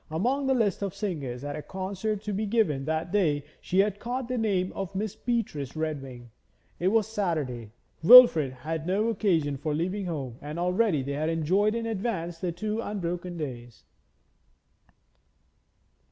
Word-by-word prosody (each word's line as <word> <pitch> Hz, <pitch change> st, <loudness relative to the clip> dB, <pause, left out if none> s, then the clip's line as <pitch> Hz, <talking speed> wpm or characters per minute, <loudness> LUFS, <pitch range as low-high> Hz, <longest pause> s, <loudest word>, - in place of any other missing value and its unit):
Among 250 Hz, -, 0 dB
the 265 Hz, -, +3 dB
list 215 Hz, -6 st, +1 dB
of 200 Hz, -1 st, -3 dB
singers 145 Hz, -, -4 dB
at 145 Hz, 0 st, -4 dB
a 155 Hz, -, -5 dB
concert 195 Hz, +4 st, -4 dB
to 210 Hz, -1 st, -3 dB
be 210 Hz, +2 st, -1 dB
given 180 Hz, -12 st, +1 dB
that 160 Hz, +2 st, -2 dB
day 155 Hz, -8 st, +2 dB, 0.2 s
she 185 Hz, -, -2 dB
had 205 Hz, 0 st, -1 dB
caught 245 Hz, +2 st, -3 dB
the 255 Hz, 0 st, -2 dB
name 190 Hz, -4 st, 0 dB
of 195 Hz, 0 st, -5 dB
Miss 205 Hz, +1 st, -2 dB
Beatrice 205 Hz, -, -2 dB
Redwing. 135 Hz, -7 st, -5 dB, 0.5 s
It 180 Hz, -, +1 dB
was 220 Hz, +1 st, +3 dB
Saturday; 155 Hz, -, -2 dB, 0.3 s
Wilfrid 165 Hz, -, +9 dB
had 155 Hz, +5 st, -5 dB
no 205 Hz, +5 st, +1 dB
occasion 170 Hz, -10 st, +1 dB
for 150 Hz, +2 st, -2 dB
leaving 185 Hz, +4 st, -2 dB
home 135 Hz, -8 st, -5 dB
and 150 Hz, +2 st, -6 dB
already 180 Hz, -3 st, +1 dB
they 140 Hz, -, -4 dB
had 155 Hz, +3 st, -1 dB
enjoyed 185 Hz, +7 st, +1 dB
in 230 Hz, 0 st, -2 dB
advance 190 Hz, -6 st, -3 dB
the 180 Hz, 0 st, -2 dB
two 215 Hz, +6 st, -3 dB
unbroken 180 Hz, -4 st, -4 dB
days. 120 Hz, -6 st, -7 dB
180 Hz, 160 wpm, -27 LUFS, 150-210 Hz, 0.5 s, Wilfrid